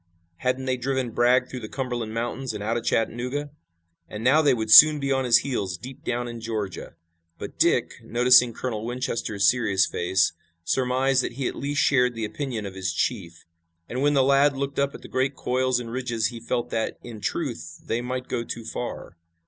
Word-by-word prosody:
Hadn't 130 +4 -1
they 130 -1 0
driven 130 -1 -2
Bragg 125 +2 +3
through 130 - -7
the 110 -3 -8
Cumberland 120 -4 -4
Mountains 120 +2 -3
and 105 - -5
out 110 +2 -1
of 120 - -2
Chattanooga, 125 +7 -1 0.6
and 105 +1 -7
now 140 +6 +5
they 140 -4 +3
would 110 -2 -3
soon 155 +5 +10
be 140 -1 -2
on 135 -1 +1
his 120 -2 +6
heels 100 -9 -2
deep 130 +8 -11
down 120 0 -2
in 120 -1 -7
Georgia. 110 -4 -5 0.4
But - - -9
Dick, - - +2
noticing 125 +1 +5
Colonel 110 -2 -4
Winchester's 115 -5 -1
serious 100 -6 +3
face, 90 0 +1 0.3
surmised 130 +5 +1
that - - -4
he 135 +1 -2
at - - -3
least 140 +1 -1
shared 125 -3 +3
the 115 -1 -3
opinion 115 -1 -4
of 100 - -6
his 95 -1 -3
chief. 85 -3 -3 0.4
And 125 +2 -4
when 145 +1 +3
the 135 - +4
lad 140 +1 +3
looked 140 0 -3
up 140 0 0
at - - -11
the - - -9
great 135 +2 -1
coils 130 0 0
and 115 -2 -7
ridges 120 -3 -1
he 120 -2 -8
felt 120 +1 -3
that, 110 - -2
in 115 -3 -9
truth, 85 -3 -4
they 115 - -1
might 125 +1 -4
go 115 - -2
too 115 -1 -7
far. 115 -8 -6
125 Hz, 200 wpm, -25 LUFS, 110-130 Hz, 0.6 s, soon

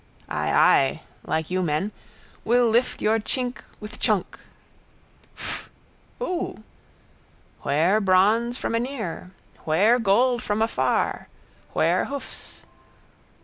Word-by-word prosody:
Ay, 75 0 -1
ay. 135 - +4 0.3
Like 160 +1 -1
you 185 0 +1
men. 170 +5 -1 0.5
Will 240 +1 +3
lift 235 +3 +1
your 220 +1 +3
tschink 250 +3 -2 0.2
with 210 0 -9
tschunk. 210 -6 0 1.0
Fff! - - -5 0.5
Oo! 365 -8 -3 1.0
Where 170 +9 +2
bronze 210 +6 +3
from - - -3
anear? 230 -8 -3 0.3
Where 205 +10 +3
gold 240 +3 +3
from 205 +1 -1
afar? 225 - 0 0.5
Where - - +2
hoofs? 280 0 -6
215 Hz, 105 wpm, -24 LUFS, 185-240 Hz, 1.0 s, ay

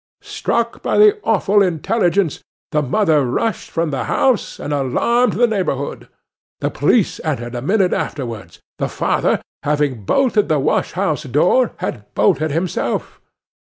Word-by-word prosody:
'Struck 235 0 -2
by - - 0
the 425 0 +6
awful 205 -1 +2
intelligence, 180 0 +1 0.3
the 150 - +2
mother 155 0 +2
rushed 205 - -2
from 165 -2 -1
the 135 -2 -2
house, 260 -5 0
and 145 - -4
alarmed 235 - +1
the 245 - +3
neighbourhood. 180 - -2 0.5
The - - -1
police - - +1
entered 120 +1 -3
a 120 - -4
minute 190 - +2
afterwards. 115 - -5 0.2
The - - -1
father, - - 0 0.2
having 145 -6 -1
bolted 230 - +2
the 155 - +3
wash 140 - 0
house 180 -5 -1
door, 175 - +2
had 105 -2 -5
bolted 145 +9 +2
himself. 165 +3 -2
160 Hz, 140 wpm, -18 LUFS, 135-210 Hz, 0.5 s, the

